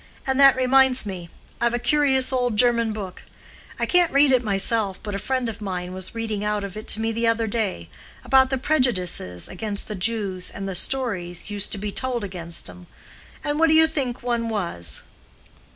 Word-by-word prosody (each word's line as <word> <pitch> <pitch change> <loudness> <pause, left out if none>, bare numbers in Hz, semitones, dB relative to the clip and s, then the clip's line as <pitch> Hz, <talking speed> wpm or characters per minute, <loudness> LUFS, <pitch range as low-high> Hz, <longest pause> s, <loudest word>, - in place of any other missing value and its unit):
And 265 0 0
that 275 -1 +8
reminds 260 -1 +3
me, 180 -4 -6 0.3
I've 235 0 +2
a - - +1
curious 265 0 +2
old 245 -4 0
German 235 -1 +3
book—I 200 -4 -8
can't 355 -2 +3
read 280 0 +5
it 255 -2 +4
myself, 200 -1 0
but 210 - -5
a 200 - -2
friend 255 +3 -1
of 225 -1 -6
mine 180 -2 -4
was 185 +3 -5
reading 220 -3 -3
out 210 -1 -1
of 200 -1 -6
it 215 - -8
to - - +2
me 225 0 0
the 230 +1 0
other 230 0 +1
day—about 215 - -1
the 265 - 0
prejudices 190 - 0
against 200 +2 -5
the 215 - -4
Jews, 200 -2 -2
and 195 0 -6
the 195 - -3
stories 185 -5 -1
used 205 -1 -3
to - - -1
be 205 +1 -4
told 245 0 -2
against 170 -3 -4
'em, 90 -1 -12 0.6
and 295 +1 -1
what 330 - +5
do 315 - +4
you 320 0 +7
think 270 -6 -3
one 235 -2 -1
was? 170 - +2
225 Hz, 190 wpm, -23 LUFS, 195-255 Hz, 0.6 s, that